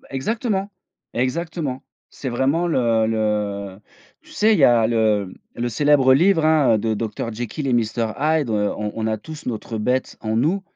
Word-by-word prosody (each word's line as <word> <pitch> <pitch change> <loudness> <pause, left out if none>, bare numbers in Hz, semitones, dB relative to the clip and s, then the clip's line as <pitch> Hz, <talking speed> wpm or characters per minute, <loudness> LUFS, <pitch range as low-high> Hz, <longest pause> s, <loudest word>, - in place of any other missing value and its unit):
Beh, - - -21
exactement, 200 - -2 0.4
exactement. 135 +1 -2 0.3
C'est 135 - -6
vraiment 135 +8 +1
le 115 -8 +2
le 105 -3 -2 0.4
tu 310 - -20
sais? 220 -7 +3
Il 200 - +2
y 140 - +6
a 115 -3 +5
le 110 -4 +1 0.2
le 120 +1 -2
célèbre 135 +1 +4
livre, 165 +2 +3
hein, 155 -7 +4
heu, - - +2
de 110 +1 -1
docteur 115 +1 -4
Jekyll 120 +5 -5
et 130 - 0
Mister 115 0 0
Hyde, 155 -3 +1
heu, 105 -1 0
on 105 -1 -3
on 110 -1 -2
a 110 -1 -1
tous 155 +5 -10
notre 115 -1 -4
bête 125 +4 -1
en 110 0 -2
nous. 175 +11 +1
120 Hz, 185 wpm, -21 LUFS, 110-155 Hz, 0.4 s, y